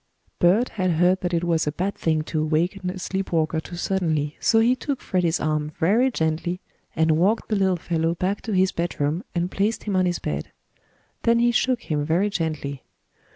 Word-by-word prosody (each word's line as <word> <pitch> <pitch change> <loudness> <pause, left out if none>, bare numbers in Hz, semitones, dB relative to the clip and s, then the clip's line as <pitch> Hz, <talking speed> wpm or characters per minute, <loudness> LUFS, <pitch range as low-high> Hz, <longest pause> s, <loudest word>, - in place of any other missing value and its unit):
Bert 200 +8 +4
had 185 -4 0
heard 180 +3 +3
that 180 - -1
it 170 -1 0
was 165 -2 +1
a - - +1
bad 185 +6 -2
thing 155 -2 0
to 155 0 -2
awaken 175 +5 0
a 185 - -5
sleep 190 +1 -3
walker 160 -1 +1
too 165 +3 -8
suddenly, 160 -5 -1
so 225 - +3
he 240 +3 +4
took 275 0 -3
Freddie's 175 -3 0
arm 155 0 -1
very 220 +10 +3
gently 165 -3 -1 0.4
and 160 -1 +3
walked 205 +6 +1
the 215 - +1
little 190 -2 +2
fellow 165 -1 -1
back 190 +4 -1
to 225 - -5
his 190 0 +3
bedroom 170 0 -2
and 175 +1 -1
placed 210 +3 0
him 205 -3 -2
on 185 -1 +3
his 175 -1 0
bed. 75 0 -4 0.7
Then 230 0 +3
he 240 0 +3
shook 245 0 +1
him 150 -3 -1
very 175 +7 +1
gently. 155 -6 -3
175 Hz, 200 wpm, -24 LUFS, 160-195 Hz, 0.7 s, Bert